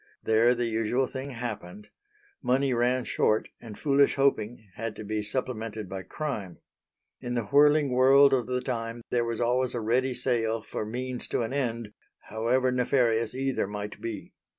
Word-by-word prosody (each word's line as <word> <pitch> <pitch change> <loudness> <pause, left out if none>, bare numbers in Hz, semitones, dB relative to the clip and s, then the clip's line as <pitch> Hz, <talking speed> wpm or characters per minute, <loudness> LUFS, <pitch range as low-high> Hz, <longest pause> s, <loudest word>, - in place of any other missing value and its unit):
There 115 +3 +4
the 120 0 -1
usual 115 +3 0
thing 130 +2 -6
happened. 105 -5 -6 0.5
Money 130 +1 +2
ran 125 +1 +1
short 110 -2 +1
and 110 -3 -9
foolish 140 -1 +3
hoping 120 -5 0
had 115 -1 -5
to 110 - -7
be 105 +1 -2
supplemented 110 -2 -3
by 95 +1 -5
crime. 100 - -5 0.6
In 120 0 -4
the 120 - 0
whirling 145 +3 +4
world 135 +2 +6
of 125 -4 +1
the 125 0 -1
time 115 -2 -4
there 120 -1 +1
was 115 -1 -3
always 125 +1 +1
a - - -1
ready 125 +4 +1
sale 115 -3 0
for 105 - -5
means 125 +2 -4
to - - -1
an 115 - -4
end, 115 -6 -2 0.4
however 125 +4 +1
nefarious 120 -2 +1
either 135 -5 -1
might 105 0 -6
be. 110 -4 -6
120 Hz, 165 wpm, -27 LUFS, 110-130 Hz, 0.6 s, world